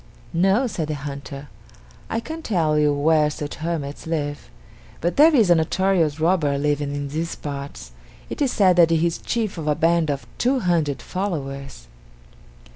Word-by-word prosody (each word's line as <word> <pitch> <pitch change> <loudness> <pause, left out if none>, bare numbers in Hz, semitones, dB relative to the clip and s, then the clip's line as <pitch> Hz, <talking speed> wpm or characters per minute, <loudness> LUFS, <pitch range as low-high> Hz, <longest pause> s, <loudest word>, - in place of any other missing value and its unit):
"No," 195 +9 +3
said 170 -10 -3
the 155 - -2
hunter; 140 0 -7 0.6
"I 225 - -1
can't 320 +7 -7
tell 165 - +1
you 150 -1 +3
where 150 +1 +3
such 150 -1 -5
hermits 155 -3 -4
live, 145 -3 -3 0.5
but 175 +2 -1
there 310 +2 +6
is 215 -9 +4
a - - +9
notorious 165 -1 +1
robber 160 -4 +2
living 145 0 -1
in 145 0 -4
these 160 +3 -3
parts. 140 - -7 0.4
It - - -7
is 275 -3 +2
said 185 -4 +4
that 170 -2 +6
he 165 0 +2
is 170 - -1
chief 220 -7 -2
of 155 - -5
a 150 - +2
band 165 0 +2
of 140 -1 -2
two 255 +1 +2
hundred 165 -7 0
followers." 140 - -5
160 Hz, 170 wpm, -22 LUFS, 145-185 Hz, 0.6 s, a